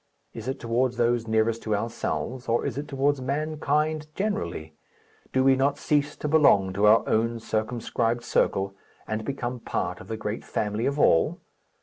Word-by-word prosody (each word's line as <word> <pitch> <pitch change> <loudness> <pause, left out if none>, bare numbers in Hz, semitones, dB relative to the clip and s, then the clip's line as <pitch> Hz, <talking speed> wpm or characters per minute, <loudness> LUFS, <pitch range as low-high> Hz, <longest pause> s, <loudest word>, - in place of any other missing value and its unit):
Is 115 +1 -8
it 135 +1 -3
towards 120 +1 0
those 120 -1 +1
nearest 110 +1 +1
to 110 -1 0
ourselves, 120 +3 -3
or 115 - +1
is 140 -4 -2
it 145 +2 -4
towards 140 0 0
mankind 150 +2 -1
generally? 85 - -3 0.6
Do 130 - +2
we 135 0 +5
not 140 +2 +1
cease 145 0 0
to - - -4
belong 140 -12 +4
to 100 +2 +3
our 110 +2 +5
own 115 +1 +1
circumscribed 115 +1 -1
circle, 100 -4 +1 0.3
and 110 0 -2
become 125 -1 -3
part - - -3
of 90 - -12
the 110 0 -4
great 110 0 -4
family 105 +2 -1
of 140 +1 -1
all? 80 - +3
120 Hz, 165 wpm, -26 LUFS, 110-140 Hz, 0.6 s, we